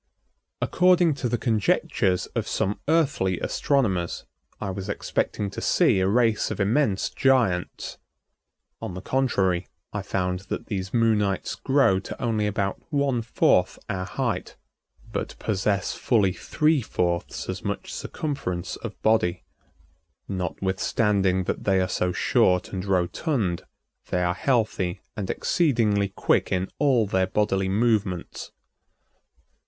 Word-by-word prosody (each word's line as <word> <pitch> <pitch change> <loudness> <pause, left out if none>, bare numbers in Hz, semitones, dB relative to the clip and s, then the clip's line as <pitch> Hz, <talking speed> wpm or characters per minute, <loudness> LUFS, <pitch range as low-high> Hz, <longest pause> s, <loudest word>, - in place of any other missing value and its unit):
According 180 -3 +4
to 125 - 0
the 120 - 0
conjectures 100 -4 +1
of - - -2
some 100 +2 -1
earthly 140 - +2
astronomers 100 -12 0 0.3
I 100 - -3
was 95 +1 -6
expecting 100 0 -2
to - - -6
see - - +3
a 95 - +2
race 115 +1 +2
of - - -4
immense 105 0 +1
giants. 120 -10 +1 0.8
On 90 - -5
the 90 - -6
contrary, 95 -10 +1 0.3
I 105 - -2
found 90 -1 -1
that - - -3
these 95 -3 -4
Moonites 110 -5 +1
grow 135 -9 +3
to 95 - -8
only 110 -3 0
about 100 -1 -2
one 140 -5 +1
fourth 110 - +2
our 95 -1 -2
height, - - -3 0.6
but - - -4
possess 100 -2 0
fully 105 -7 +2
three 155 - +1
fourths 85 -5 -2
as - - -4
much - - -4
circumference 90 - -4
of - - -8
body. 95 -5 +2 0.8
Notwithstanding 95 +1 0
that - - -3
they 95 -1 +3
are 90 - +1
so 90 0 0
short 90 +1 +2
and 95 -1 -3
rotund, 95 - 0 0.4
they 90 - +1
are 90 0 +1
healthy 110 -7 0
and 100 -4 -4
exceedingly 110 - +1
quick 95 - +1
in 95 0 -1
all 135 -6 +3
their 95 -2 +1
bodily 95 -1 +1
movements. 105 -4 0
100 Hz, 125 wpm, -25 LUFS, 95-120 Hz, 0.8 s, According